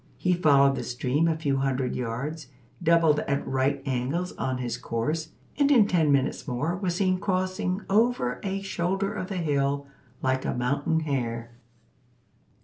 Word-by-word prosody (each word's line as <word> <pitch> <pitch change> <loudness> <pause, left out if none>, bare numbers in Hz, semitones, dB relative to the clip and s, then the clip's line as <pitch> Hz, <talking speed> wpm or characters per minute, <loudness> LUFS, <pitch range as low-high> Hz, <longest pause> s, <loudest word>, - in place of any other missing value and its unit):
He 180 - +1
followed 140 -5 +4
the - - -3
stream 130 +6 0
a 160 -1 +1
few 140 -4 0
hundred 135 -2 -1
yards, 125 +5 -4 0.3
doubled 165 -2 +4
at 140 0 -1
right 135 +1 0
angles 135 +7 -1
on 130 -1 -2
his 125 -2 -3
course, 155 +8 -2 0.3
and 285 -1 +4
in 245 -7 +6
ten 165 -6 +2
minutes 140 +2 0
more 145 +7 -1
was 180 -2 -2
seen 185 -1 +1
crossing 185 0 -1
over 210 - +2
a 195 0 -3
shoulder 195 +2 -1
of 185 - -4
the 195 - -4
hill, 140 -3 0 0.4
like 130 0 +1
a - - -2
mountain 140 +6 0
hare. 120 -6 -2
150 Hz, 155 wpm, -26 LUFS, 130-180 Hz, 0.4 s, in